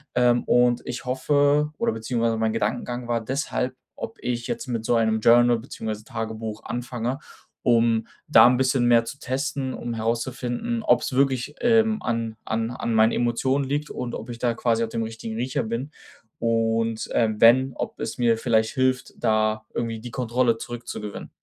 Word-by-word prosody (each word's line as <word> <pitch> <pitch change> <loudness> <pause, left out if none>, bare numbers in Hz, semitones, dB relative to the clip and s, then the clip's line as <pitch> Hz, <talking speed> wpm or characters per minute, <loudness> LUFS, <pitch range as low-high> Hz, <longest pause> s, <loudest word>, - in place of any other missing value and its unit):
Ähm, 120 -1 +3
und 120 0 +3
ich 125 +1 -5
hoffe, 145 +3 +2
oder - - +1
beziehungsweise 115 0 -1
mein 110 0 0
Gedankengang 120 +1 -2
war 120 -1 0
deshalb, 130 0 -2 0.2
ob 225 0 -7
ich 120 -1 -2
jetzt - - -4
mit 115 -2 -3
so 120 - +2
einem 110 -1 +2
Journal 120 +1 +5
beziehungsweise 110 -3 -6
Tagebuch 110 -1 -5
anfange, 120 +1 -3 0.5
um 115 -2 +3 0.2
da - - +8
'n 125 0 +3
bisschen 130 -1 +2
mehr 115 -1 +5
zu 140 +4 -8
testen, 135 0 -2
um 120 - -5
herauszufinden, 120 - -2
ob's 130 - +2
wirklich, 135 +1 +1
ähm, 225 -2 +3
an 115 -1 -2
an 115 +1 -1
an 115 -2 -3
meinen 110 +1 +5
Emotionen 130 +3 0
liegt 145 +2 -2
und 125 -1 -4
ob - - -8
ich 115 -1 -7
da 120 -2 +1
quasi 115 -1 +1
auf 110 - -2
dem 115 0 -2
richtigen 110 0 -6
Riecher 125 +3 -1
bin. 115 +7 -4 0.5
Und, 115 -1 0
ähm, 110 -2 +1
wenn, 130 +3 +6
ob - - -5
es 110 - -4
mir 115 -2 +3
vielleicht 110 -2 +1
hilft, 130 -1 0
da 110 0 +1
irgendwie 115 -1 -3
die 120 +1 -8
Kontrolle 120 -1 +1
zurückzugewinnen. 115 -3 -7
120 Hz, 170 wpm, -24 LUFS, 115-130 Hz, 0.5 s, da